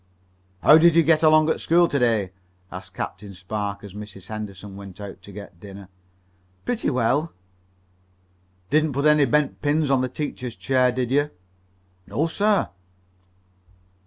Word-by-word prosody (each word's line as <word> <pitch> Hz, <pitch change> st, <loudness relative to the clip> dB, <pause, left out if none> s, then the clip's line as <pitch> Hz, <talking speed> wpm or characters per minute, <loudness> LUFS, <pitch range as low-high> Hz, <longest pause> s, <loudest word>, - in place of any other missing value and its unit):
"How 155 Hz, -, +8 dB
did 170 Hz, 0 st, +5 dB
you 165 Hz, -, +6 dB
get 155 Hz, 0 st, +3 dB
along 155 Hz, 0 st, +5 dB
at -, -, -2 dB
school 170 Hz, +1 st, +4 dB
to 140 Hz, -, -1 dB
day?" 110 Hz, -6 st, +1 dB, 0.4 s
asked 90 Hz, +1 st, -9 dB
Captain 100 Hz, +1 st, -6 dB
Spark, 100 Hz, +2 st, -4 dB
as 100 Hz, -3 st, -10 dB
Mrs. 100 Hz, -3 st, -10 dB
Henderson 105 Hz, -2 st, -7 dB
went 100 Hz, -2 st, -11 dB
out 100 Hz, -2 st, -9 dB
to 100 Hz, -, -13 dB
get 100 Hz, -4 st, -11 dB
dinner. 100 Hz, 0 st, -11 dB, 0.8 s
"Pretty 245 Hz, -2 st, -1 dB
well." 130 Hz, +6 st, 0 dB, 1.4 s
"Didn't 155 Hz, -1 st, +2 dB
put 140 Hz, +3 st, -1 dB
any 150 Hz, -1 st, +5 dB
bent 145 Hz, +3 st, 0 dB
pins 145 Hz, 0 st, +1 dB
in 135 Hz, -2 st, +3 dB
the 130 Hz, -, -1 dB
teacher's 125 Hz, -4 st, -5 dB
chair, 125 Hz, +7 st, +2 dB
did 125 Hz, 0 st, -2 dB
you?" 145 Hz, +2 st, +2 dB, 0.8 s
"No, 150 Hz, -, 0 dB
sir." 200 Hz, -, +1 dB
125 Hz, 150 wpm, -23 LUFS, 100-150 Hz, 1.4 s, How